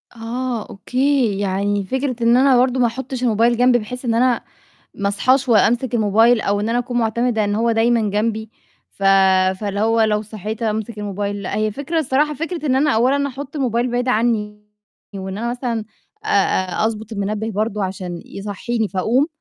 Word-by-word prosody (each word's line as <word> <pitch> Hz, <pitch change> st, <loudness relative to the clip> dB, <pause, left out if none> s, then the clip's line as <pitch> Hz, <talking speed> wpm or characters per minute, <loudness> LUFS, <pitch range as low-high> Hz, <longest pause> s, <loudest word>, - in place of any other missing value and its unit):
آه، 235 Hz, 0 st, -4 dB
أوكي، 250 Hz, -1 st, 0 dB
يعني 200 Hz, +1 st, 0 dB
فكرة 255 Hz, +1 st, -2 dB
إن 235 Hz, +1 st, +5 dB
أنا 265 Hz, -1 st, +5 dB
برضه 255 Hz, +1 st, +2 dB
ما 240 Hz, -, +4 dB
أحطّش 255 Hz, +2 st, -5 dB
الموبايل 235 Hz, +1 st, +2 dB
جنبي 245 Hz, 0 st, +4 dB
بحيث 250 Hz, +4 st, -7 dB
إن 230 Hz, -, +1 dB
أنا 245 Hz, 0 st, +2 dB, 0.5 s
ما 200 Hz, -1 st, -1 dB
أصحاش 255 Hz, +6 st, +2 dB
وأمسك 240 Hz, +3 st, +3 dB
الموبايل، 225 Hz, +2 st, +4 dB
أو 205 Hz, 0 st, 0 dB
إن 215 Hz, -, -2 dB
أنا 235 Hz, +1 st, +1 dB
أكون 245 Hz, 0 st, -2 dB
معتمدة 225 Hz, -1 st, +1 dB
إن 205 Hz, -, -1 dB
هو 230 Hz, +2 st, +1 dB
دايمًا 225 Hz, -2 st, +2 dB
جنبي 220 Hz, +1 st, -1 dB, 0.4 s
ف 195 Hz, -, -15 dB, 0.6 s
فاللي 205 Hz, -1 st, -3 dB
هو 225 Hz, +1 st, +2 dB
لو 215 Hz, -1 st, +2 dB
صحيت 215 Hz, +2 st, -6 dB
أمسك 220 Hz, 0 st, -2 dB
الموبايل، 205 Hz, 0 st, -3 dB
لأ 185 Hz, -, -4 dB
هي 215 Hz, 0 st, 0 dB
فكرة 285 Hz, +8 st, -3 dB
الصراحة 300 Hz, +1 st, +1 dB
فكرة 330 Hz, +1 st, -4 dB
إن 260 Hz, -, +2 dB
أنا 290 Hz, +2 st, +3 dB
أولًا 275 Hz, +4 st, +2 dB
أحُط 280 Hz, +2 st, -8 dB
الموبايل 245 Hz, -2 st, 0 dB
بعيد 245 Hz, +1 st, -1 dB
عنّي 215 Hz, -3 st, 0 dB, 0.5 s
وإن 190 Hz, 0 st, -5 dB
أنا 235 Hz, +1 st, -2 dB
مثلًا 240 Hz, -3 st, -3 dB, 0.4 s
آآ -, -, -6 dB
آآ 190 Hz, 0 st, +1 dB
أضبُط 220 Hz, 0 st, -5 dB
المنبه 215 Hz, +2 st, -2 dB
برضه 210 Hz, 0 st, -1 dB
عشان 185 Hz, -2 st, -5 dB
يصحّيني 210 Hz, +2 st, -3 dB
فأقوم، 225 Hz, -, +1 dB
225 Hz, 175 wpm, -20 LUFS, 210-250 Hz, 0.6 s, إن